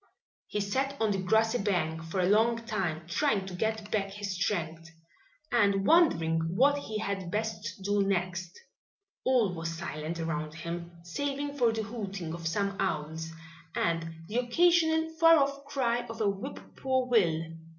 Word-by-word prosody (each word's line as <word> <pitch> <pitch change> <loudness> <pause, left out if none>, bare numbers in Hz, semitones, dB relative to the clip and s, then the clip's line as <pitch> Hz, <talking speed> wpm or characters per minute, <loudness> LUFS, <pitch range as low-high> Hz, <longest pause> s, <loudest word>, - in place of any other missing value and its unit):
He 210 - -2
sat 270 +7 -1
on 220 -2 +2
the 195 -1 0
grassy 220 +5 +2
bank 170 -5 0
for 165 +4 -3
a - - +3
long 230 +3 +3
time, 180 -8 -2
trying 200 - +1
to 190 - -7
get 220 +2 -2
back 195 -2 0
his 200 0 -5
strength 170 -4 -2 0.6
and 200 -4 +3
wondering 165 - +4 0.2
what 285 +6 +4
he 220 -6 -4
had 200 -4 -3
best 215 -1 -3
do 205 +1 +2
next. 180 -2 -1 0.6
All 245 -7 +3
was 165 -1 -4
silent 165 -1 -4
around 155 -1 -3
him, 170 +1 -5
saving 285 +9 -3
for 240 -5 +3
the 220 0 -2
hooting 200 -7 -5
of 170 -1 -4
some 200 +3 -1
owls 160 -3 -2 0.5
and 165 -1 -1
the 220 - -3
occasional 320 +5 +3
far 330 0 +8
off 280 -1 0
cry 240 -4 0
of 225 -1 -7
a 215 - +2
whip 200 +8 -3 0.2
poor 260 -1 +1
will. 185 -10 +3
200 Hz, 160 wpm, -30 LUFS, 170-240 Hz, 0.6 s, far